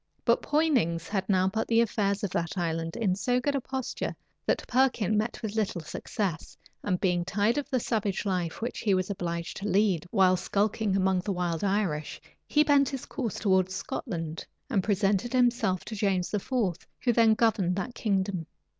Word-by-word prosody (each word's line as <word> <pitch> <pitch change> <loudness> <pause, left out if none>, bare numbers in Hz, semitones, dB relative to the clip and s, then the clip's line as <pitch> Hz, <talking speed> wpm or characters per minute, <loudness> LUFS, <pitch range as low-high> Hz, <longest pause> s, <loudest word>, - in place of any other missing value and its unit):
But - - +3
Poynings 255 - +1
had 195 -2 -2
now 185 -1 +3
put 220 +3 -1
the 230 0 +3
affairs 205 -3 +1
of 200 - -1
that 170 +3 -2
island 165 -1 -2
in 210 -6 +1
so 245 +5 +1
good 285 +3 0
a 275 - 0
posture, 265 0 -4 0.3
that - - +1
Perkin 240 -5 +2
met 215 +2 -1
with 215 -2 -3
little 210 -5 -1
success; 175 +2 -4 0.3
and 185 -3 0
being 180 -3 +1
tired 210 +8 +1
of 285 - -6
the 260 -3 +1
savage 215 -4 -1
life 180 0 -2
which 240 - -3
he 200 -4 +2
was 185 +2 -1
obliged 170 -2 -4
to 200 - -4
lead, 195 -5 +2
while 185 -3 +4
skulking 205 +2 0
among 190 -1 +2
the 200 +3 -3
wild 175 -2 -1
Irish, 190 -7 -1 0.3
he 300 - +4
bent 285 -2 +4
his 270 -3 -5
course 235 -7 -4
towards 190 -2 +2
Scotland, 165 -4 -4 0.3
and 200 -6 +2
presented 205 +3 +1
himself 240 -7 +2
to 220 - -6
James 195 -3 0
IV., 210 - -3
who 240 +1 -1
then 225 -1 +5
governed 210 -6 +2
that 220 +6 -3
kingdom. 190 -6 -1
200 Hz, 180 wpm, -28 LUFS, 180-230 Hz, 0.3 s, then